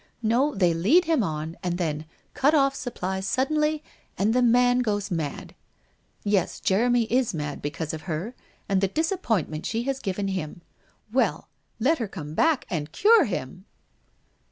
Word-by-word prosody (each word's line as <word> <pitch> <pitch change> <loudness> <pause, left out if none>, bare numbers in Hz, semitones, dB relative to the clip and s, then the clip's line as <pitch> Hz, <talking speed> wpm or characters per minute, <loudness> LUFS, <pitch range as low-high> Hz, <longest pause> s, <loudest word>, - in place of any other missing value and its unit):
No, 245 +6 +2
they 180 -4 +3
lead 235 - +4
him 320 -5 +2
on, 160 -3 -3
and 175 -1 -2
then 155 -3 -2 0.3
cut 290 +4 +3
off 275 -2 +4
supplies 190 -7 -4
suddenly, 300 +5 +1 0.3
and 210 +3 +2
the 250 - +3
man 245 +1 +4
goes 205 -4 -1
mad. 160 -5 -4 0.7
Yes, 200 -4 0
Jeremy 240 +5 +2
is 235 -2 0
mad 145 -2 -4
because 145 +2 -4
of 160 - -5
her, 170 +10 -3 0.3
and 195 -1 +1
the 195 - +3
disappointment 225 - -1
she 230 +1 -1
has 270 +1 -2
given 195 -2 -2
him. 175 -3 -4 0.5
Well, 260 - +1 0.3
let 280 +7 +2
her 230 - -2
come 155 -5 -8
hack 320 - +2
and 150 -3 -3
cure 435 - +5
him 180 - -5
205 Hz, 155 wpm, -25 LUFS, 170-255 Hz, 0.7 s, cure